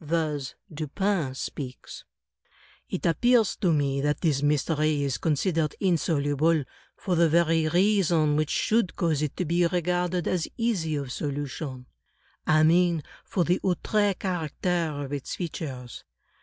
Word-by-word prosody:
Thus 150 -4 -2 0.2
Dupin 155 -1 -1
speaks: 130 -1 -7 0.8
"It - - -4
appears 235 +5 +3
to 185 -5 +2
me 140 -3 +1
that 150 +1 0
this 150 -6 +1
mystery 150 0 +1
is 135 -3 -1
considered 160 0 0
insoluble, 155 -3 +1 0.3
for 190 - -2
the 170 -1 +4
very 165 -1 +3
reason 175 -5 +3
which 155 0 0
should 220 -4 +1
cause 160 -5 0
it 150 -2 -3
to 180 - -1
be 170 +2 +2
regarded 180 0 0
as 175 -3 0
easy 195 -10 0
of 140 -3 -4
solu 145 +2 -3
tion 130 -2 -7 0.3
— - - -38 0.2
I 155 0 +5
mean, 170 -1 +3 0.2
for 180 - 0
the 175 +3 +1
outre 200 +2 +1
character 175 -2 -1
of 135 - -7
its 140 -2 -4
features. 135 -8 -6
160 Hz, 140 wpm, -26 LUFS, 145-180 Hz, 0.8 s, I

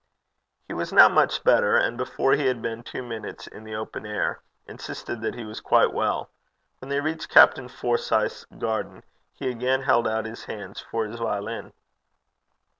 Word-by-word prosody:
He - - -6
was - - -3
now - - +9
much - - +2
better, - - +4
and 120 - +2
before 130 +2 0
he 140 -2 +2
had 125 -2 0
been 115 0 -4
two 125 - -7
minutes 115 -3 -7
in 110 - -12
the 110 0 -6
open 110 0 -6
air, 105 -1 -2 0.2
insisted 120 - -7
that 110 - -3
he 120 - -7
was 110 0 -8
quite - - +3
well. - - -1 0.5
When 130 - -10
they 140 0 0
reached 160 +2 -3
Captain - - +7
Forsyth's 475 +1 -1
garden - - -4 0.3
he 135 - -6
again 130 +2 0
held 120 -3 +3
out 110 0 -1
his 110 +1 -8
hands 100 -2 -8
for 115 -1 -3
his 115 +2 -8
violin. 105 -3 -3
115 Hz, 175 wpm, -25 LUFS, 110-130 Hz, 0.5 s, now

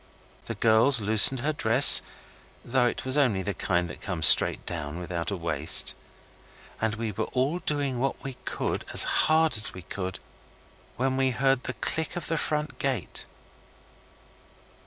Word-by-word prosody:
The - - -6
girls 115 +4 +3
loosened 110 +4 +5
her 155 +3 -2
dress, 125 0 +7 0.6
though 125 0 0
it 120 - -5
was 130 +3 +3
only 110 -9 0
the 100 +2 -4
kind 90 -1 -2
that 75 - -12
comes 90 -6 -2
down - - +11
straight - - +1 0.3
without 85 -1 -6
a 100 - -5
waist. 80 -3 +1 0.9
And 110 -1 -2
we 110 0 -5
were 110 +2 -5
all 135 +7 -3
doing 140 -6 -3
what 135 +2 -4
we 135 - -7
could - - -5
as - - +6
hard 160 -3 +1
as 110 - +1
we 90 - -11
could, 95 -1 -7 0.8
when 130 +1 -2
we 135 0 0
heard 135 +1 -1
the 130 - -5
click 160 +4 -3
of 175 - -6
the 165 - -2
front 150 -1 -4
gate. 135 -4 -5
120 Hz, 160 wpm, -25 LUFS, 100-135 Hz, 0.9 s, down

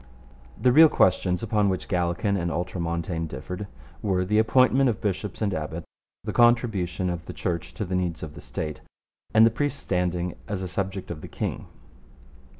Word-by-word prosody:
The 125 - +4
real 160 +4 +8
questions 90 -3 +2
upon 105 -2 +2
which 95 -1 -2
Gallican 90 +1 0
and 85 -3 -1
Ultramontane 85 0 -2
differed 90 +9 -6 0.3
were 95 -3 +1
the 105 +3 +2
appointment 130 +4 +4
of 110 - -2
bishops 105 +1 -2
and 100 -2 0
abbots, 80 0 -4 0.4
the - - -4
contribution 110 -7 +2
of 85 -1 -3
the - - -6
Church 85 -2 -3
to 105 - -3
the 90 - -5
needs 90 -3 -1
of 75 -2 -6
the 85 - -10
State, 80 -5 -5 0.5
and 110 +1 +7
the 115 - +4
priest's 145 +4 -1
standing 90 -1 -1
as 100 -2 -3
a - - -3
subject 95 0 -3
of 75 -3 -6
the - - -8
king. - - -4
95 Hz, 175 wpm, -26 LUFS, 85-105 Hz, 0.5 s, real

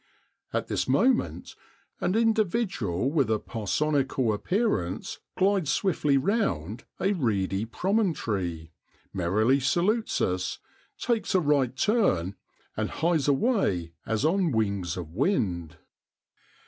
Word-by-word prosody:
At - - -1
this - - -2
moment 255 -1 +1 0.5
an 185 - 0
individual 205 - +1
with 140 -7 +2
a 110 - +2
parsonical 130 +2 0
appearance 105 - -1 0.2
glides 190 -5 +2
swiftly 150 -7 +1
round 125 - -1
a 195 - +1
reedy 105 - -1
promon 190 - 0
tory, 85 -6 -3 0.4
merrily 105 +9 +2
salutes 185 - +1
us, 90 0 -1 0.4
takes 230 -4 -1
a - - +6
right 140 -6 +1
turn, 115 - +1 0.4
and - - -1
hies 160 -3 0
away 135 - +1
as 110 +5 -1
on 175 0 +2
wings 100 -7 -1
of 85 -3 -6
wind. 90 - -1
135 Hz, 110 wpm, -27 LUFS, -, 0.5 s, a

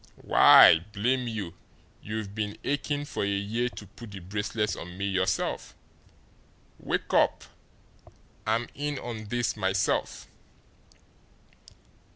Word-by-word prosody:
Why, 80 - +8
blame 125 +4 0
you, 105 -7 -4 0.5
you've 105 -1 -5
been 105 -1 -3
aching 145 +1 -2
for - - -3
a - - 0
year 105 +5 -1
to 110 - -10
put 110 +3 -12
the 100 -1 -8
bracelets 105 +2 -2
on 90 +1 -9
me 100 - -2
yourself! 95 -1 -1
Say, - - -20 1.0
wake - - -3
up! - - +3 1.0
I'm 115 +2 +1
in 145 0 -3
on 115 -4 -6
this 120 +2 -1
myself." 95 -2 -1
105 Hz, 120 wpm, -27 LUFS, 100-120 Hz, 1.0 s, Why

